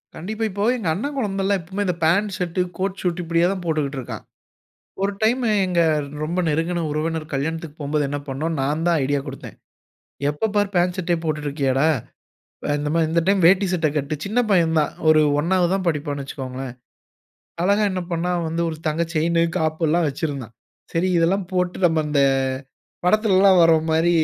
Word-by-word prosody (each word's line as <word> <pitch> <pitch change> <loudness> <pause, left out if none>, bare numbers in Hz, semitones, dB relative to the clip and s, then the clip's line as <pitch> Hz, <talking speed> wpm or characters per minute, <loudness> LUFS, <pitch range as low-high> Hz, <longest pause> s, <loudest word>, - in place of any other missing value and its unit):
கண்டிப்பா. 215 +7 -4
இப்போ 200 +2 -3
எங்க 195 -8 -4
அண்ணன் 280 - -3
குழந்தைல்லாம் 195 -4 0
எப்பயுமே 190 +5 -3
இந்த 180 - 0
பேண்ட், 200 +4 +2
ஷர்ட், 180 0 -3 0.2
கோட், 190 +1 -2
சூட் 180 -1 -1
இப்டியே 170 +1 +2
தான் 195 -2 -4
போட்டுட்டு 150 -4 -1
இருக்கான். 125 - -7 0.8
ஒரு 200 +1 +1
டைம்மு 235 +1 +2 0.2
எங்க 175 -2 +2 0.4
ரொம்ப 165 +4 -2
நெருங்குன 165 +3 0
உறவினர் 155 +1 -2
கல்யாணத்துக்கு 160 +2 -3
போம்போது 145 +1 0
என்ன 145 +1 -2
பண்ணோம். 155 +4 -2
நான் 150 +5 -1
தான் 170 -2 +3
ஐடியா 140 +1 0
குடுத்தேன். 135 -1 -8 0.7
எப்ப 150 +10 -1
பாரு 205 -1 +3
பேண்ட், 180 +1 +2
ஷர்டே 175 -1 0
போட்டுட்டு 150 -2 -2
இருக்கியாடா. 140 0 +1 0.8
அ - - -3
இந்த 150 0 -2
மாரி 165 -1 +3
இந்த 170 +1 +2
டைம் 195 -1 +3
வேட்டி, 195 +2 +5
சட்டை 165 -3 +1
கட்டு. 145 +1 -1
சின்ன 215 +5 -1
பையன் 165 -4 +3
தான் 150 - -1 0.2
ஒரு 155 -1 +6 0.2
1ஆவது 175 +1 +2
தான் 190 -2 -2
படிப்பான்னு 145 -2 -2
வச்சிக்கோங்கோளேன். 130 -2 -6 0.9
அழகா 200 +3 +3
என்ன 185 - -2
பண்னான் 170 0 -1
வந்து 165 +1 -1
ஒரு 160 - -4
தங்க 155 +2 0
செயினு, 165 +2 +2 0.2
காப்பு 160 0 -1
எல்லாம் 165 +1 +2
வச்சிருந்தான். 135 -5 -4 0.4
சரி 175 +3 +1
இதெல்லாம் 180 +3 +1
போட்டு 180 -1 0
நம்ம 160 -2 +2
அந்த 145 -1 +2 0.8
அ - - -4
படத்துலல்லாம் 195 -2 +4
வர்றோம் 160 -1 +4
மாரி 160 +2 +3
165 Hz, 175 wpm, -22 LUFS, 155-185 Hz, 0.9 s, ஒரு